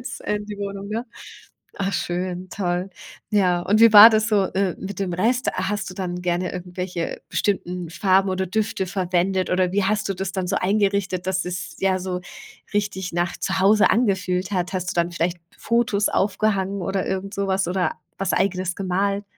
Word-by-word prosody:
ins 245 - -7
in 210 0 -2
die 210 - -6
Wohnung, 200 0 -5
ne? 225 +4 -3 0.7
Ach 195 0 -1
schön. 180 0 -3
Toll. 180 -1 -2 0.4
Ja, 180 -4 +3
und 210 +4 +2
wie 230 -1 +8
war 210 +3 +12
das 220 0 +2
so, 205 -3 +3
äh, 190 -2 0
mit 195 0 -6
dem 185 -3 -1
Rest? 235 +8 +1
A 185 +1 -1
hast 205 0 -2
du 180 - -8
dann 180 -2 -4
gerne 180 0 -1
irgendwelche 180 -1 -5
bestimmten 180 -3 -1
Farben 190 +2 +2
oder 190 0 -1
Düfte 215 0 -1
verwendet? 185 0 0
Oder 180 0 +1
wie 205 - +2
hast 210 +1 0
du 195 - -1
das 190 0 -4
dann 185 -2 -2
so - - -1
eingerichtet, 195 -2 0
dass 185 -1 0
es, 180 0 -5
ja, 190 -1 +2
so 180 -1 -4 0.5
richtig 195 -3 -2
nach 175 0 -1
Zuhause 195 +3 +3
angefühlt 190 -5 +1
hat? 180 -1 -1
Hast 185 0 -2
du - - -5
dann 170 +1 -1
vielleicht 170 +1 -1 0.2
Fotos 230 -3 +1
aufgehangen 200 -1 0
oder 190 +2 -1
irgendsowas 195 0 -1
oder 180 -2 0 0.3
was 195 -2 0
Eigenes 185 -2 0
gemalt? 200 +2 -1
190 Hz, 180 wpm, -23 LUFS, 180-200 Hz, 0.7 s, war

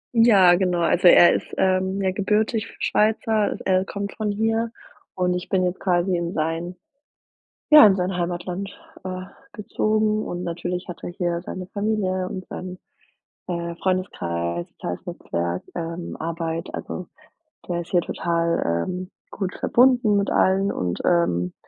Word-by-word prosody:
Ja, 200 -6 +6
genau. 180 -1 +1
Also, 175 +1 +3
er 175 0 +8
ist, - - -2
ähm, 190 +1 +1
ja, 190 - +2
gebürtig 215 +3 0
Schweizer. 215 0 +1
Er 185 0 +3
kommt 200 0 -5
von 215 -1 -2
hier 225 +2 0 0.5
und 180 -1 +1
ich 180 0 -4
bin 185 -1 +2
jetzt 180 +1 -2
quasi 180 0 +1
in 170 +1 -2
sein 165 +3 -2 1.0
ja, 300 -4 +10
in 195 - +4
sein 180 0 -1
Heimatland, 175 +2 -3 0.3
äh, 185 0 -5 0.3
gezogen 215 0 0
und 175 +1 -5
natürlich 180 +2 -4
hat 175 - -8
er - - -4
hier 175 -1 -2
seine 185 -1 -6
Familie 200 -3 -1
und 185 -1 -7
seinen, 185 0 -7 0.7
äh, 170 -1 -3
Freundeskreis, 85 - -2
soziales 90 - -6
Netzwerk, 85 - -3
ähm, 170 0 -5
Arbeit. 165 0 -4
Also, 180 - -6 0.6
der 175 0 -1
ist 170 - -12
hier 175 - +4
total, 170 - 0
ähm, 185 +1 -5 0.2
gut 190 -2 -4
verbunden 245 -4 +4
mit 200 - 0
allen 195 +1 +3
und, 90 -1 -2
ähm, 90 - +1
180 Hz, 145 wpm, -23 LUFS, 170-200 Hz, 1.0 s, ja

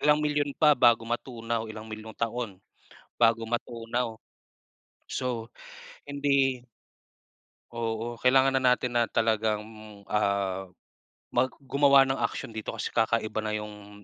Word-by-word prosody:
ilang 150 0 +4
milyon 145 -1 0
pa 150 -2 +6
bago 120 -3 +4
matunaw, 115 -1 -3
ilang 110 0 -8
milyong 110 0 -9
taon, 115 -3 -3 0.6
bago 115 -1 +3
matunaw. 120 0 -3 0.9
So, 120 -3 -3 0.6
hindi 140 -3 +1 1.1
Oo 115 0 -3
kailangan 130 +2 +4
na 130 -1 +4
natin 125 -1 -1
na 120 - +4
talagang, 110 -1 +1 0.5
ah, 100 -2 0 0.7
mag 125 +1 +3 0.2
gumawa 140 0 +5
ng 135 0 -1
aksiyon 115 0 -2
dito 110 - -4
kasi - - -3
kakaiba 110 -1 +1
na 105 0 -1
yung 105 -1 -8
115 Hz, 120 wpm, -28 LUFS, 110-130 Hz, 1.1 s, pa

